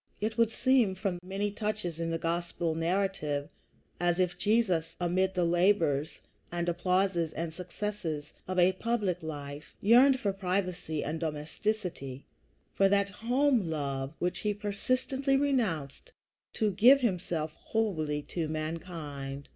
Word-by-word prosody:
It 220 +1 -1
would 230 -1 +4
seem, 245 -5 +3
from 185 -2 -2
many 195 +2 -2
touches 210 -6 -3
in 165 0 -1
the 165 - 0
Gospel 170 0 -1
narrative, 165 -4 -1 0.5
as 175 0 +1
if 180 -1 +1
Jesus, 205 -7 +1
amid 185 +2 +1
the 180 -1 +2
labors 170 -4 +2 0.3
and 175 0 -2
applauses 175 -1 +1
and 165 0 -3
successes 180 -4 -4
of 185 0 -3
a 180 +1 +6
public 200 -4 -1
life, 145 -2 -7
yearned 255 +5 +6
for 200 -4 0
privacy 180 -5 -2
and 155 +2 -3
domesticity, 155 -2 -3 0.5
for 195 0 +4
that 200 0 +2
home 245 - +2
love 140 -2 -3
which 180 0 -1
he 210 -1 -1
persistently 255 +6 0
renounced 240 - -1 0.4
to 215 -2 +1
give 245 +8 +6
himself 175 -8 -1
wholly 155 -11 -1
to 165 0 -3
mankind. 155 -3 -5
180 Hz, 130 wpm, -30 LUFS, 160-210 Hz, 0.5 s, a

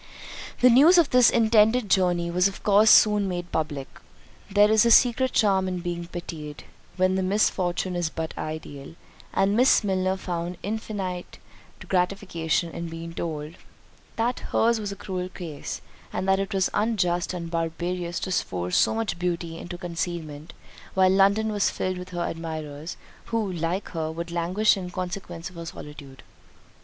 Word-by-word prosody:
The 250 0 +7
news 300 +9 +7
of 335 -4 +4
this 250 -1 +6
intended 220 0 +3
journey 175 -3 +2
was 180 +2 +3
of 195 - -8
course 210 +1 +5
soon 210 -2 +6
made 175 -1 -4
public. 145 -4 -2 0.6
There 205 +2 +4
is 220 -1 +5
a 235 - +3
secret 250 +2 +5
charm 195 -3 +2
in 185 -1 -2
being 175 -1 -4
pitied, 160 -4 -7 0.3
when 185 0 +3
the 190 - 0
misfortune 185 -2 0
is 175 -2 -1
but 160 0 -5
ideal; 155 -1 -7 0.4
and 195 +1 +2
Miss 250 0 +5
Milner 190 -1 0
found 175 -1 -4
infinite 200 -4 -4 0.5
gratification 180 -3 0
in 170 +1 -5
being 165 0 -7
told, 155 -2 -5 0.6
"That 235 +2 0
her's 230 0 +2
was 205 -2 -4
a - - -5
cruel 185 -2 -5
case, 165 -6 -7 0.3
and 185 +1 -3
that 190 0 +3
it 195 +2 -3
was 190 -2 +1
unjust 185 -6 0
and 170 -2 -6
barbarous 170 +1 -2
to 190 - -3
force 90 - -1
so - - +3
much 225 -6 -2
beauty 170 -2 -3
into 175 0 -7
concealment 165 -3 -5 0.4
while 190 -1 +5
London 200 +3 +3
was 205 -1 +1
filled 185 -1 -3
with 180 0 -8
her 175 -1 -3
admirers; 155 -1 -6 0.3
who, 225 -4 -1
like 175 +3 -2
her, 160 -2 -3
would 170 +1 -6
languish 180 +6 +2
in 185 -2 -5
consequence 180 -1 -6
of 180 - -14
her 170 - -6
solitude." 145 -4 -10
180 Hz, 160 wpm, -25 LUFS, 170-200 Hz, 0.6 s, The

